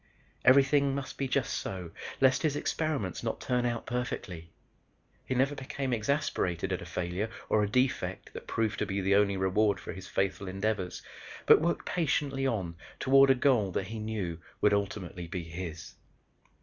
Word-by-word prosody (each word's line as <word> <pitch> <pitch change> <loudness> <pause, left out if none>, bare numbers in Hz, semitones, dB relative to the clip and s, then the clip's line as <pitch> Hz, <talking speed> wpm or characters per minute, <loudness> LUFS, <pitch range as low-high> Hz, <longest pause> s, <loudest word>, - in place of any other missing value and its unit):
Everything 140 +1 +5
must 140 -2 -5
be 135 - -2
just 130 -3 0
so 90 -3 -4 0.3
lest 130 -1 +4
his 155 -3 +1
experiment 145 - -2
not - - -2
turn 125 -1 0
out 120 -1 -3
perfectly. 95 -9 -4 0.8
He 130 - -1
never 135 +3 +2
became 135 -1 -3
exasperated 105 - 0
at 90 - -3
a 85 - -8
failure 90 +5 -2 0.2
or 110 - +3
a 105 - 0
defect 130 +4 0
that - - -8
proved 110 -2 -1
to - - 0
be 100 0 -1
the 95 +1 +2
only 100 -1 +3
reward 100 +2 +2
for - - -7
his 95 -1 -9
faithful 95 0 -1
endeavors 95 -1 -2 0.4
but - - +7
worked 170 +1 0
patiently 140 -5 0
on 95 -9 -2 0.2
toward 135 +1 +6
a 135 - +6
goal 125 -7 +3
that 95 - -2
he 110 0 -5
knew 105 -6 -3 0.2
would 105 - +4
ultimately 95 -4 -2
be 85 +1 -4
his. 85 0 -7
110 Hz, 170 wpm, -30 LUFS, 95-135 Hz, 0.8 s, but